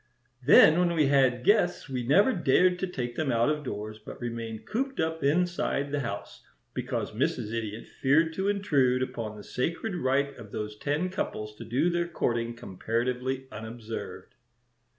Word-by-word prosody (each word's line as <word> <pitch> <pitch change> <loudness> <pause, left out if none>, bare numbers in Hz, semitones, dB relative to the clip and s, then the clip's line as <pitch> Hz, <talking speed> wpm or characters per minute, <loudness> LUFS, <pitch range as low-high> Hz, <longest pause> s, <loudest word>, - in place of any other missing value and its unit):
Then 155 +4 +7
when 175 -1 +2
we 155 -2 +4
had 130 -3 +3
guests 200 -7 +3
we 130 -2 -3
never 190 - +4
dared 180 +1 +3
to 190 - -1
take 120 -8 -4
them 145 -2 0
out 120 +4 +3
of 150 -1 -2
doors, 110 -3 -5
but 105 - -10
remained 115 -2 -5
cooped 265 +4 -2
up 160 0 -1
inside 150 -2 +1
the 145 - 0
house, 115 -7 -5 0.3
because - - -3
Mrs. 105 - -1
Idiot 110 -1 -4
feared 160 +4 +2
to 190 +4 -1
intrude 140 -11 +2
upon 115 -4 -5
the 105 - -10
sacred 165 - -2
right 140 -3 0
of 110 -4 -11
those 105 0 -4
ten 150 +10 -1
couples 105 - -4
to - - -8
do 140 +10 +1
their 175 0 0
courting 120 -7 -1
comparatively 125 +5 -2
unobserved." 110 +1 -7
130 Hz, 165 wpm, -28 LUFS, 115-165 Hz, 0.3 s, Then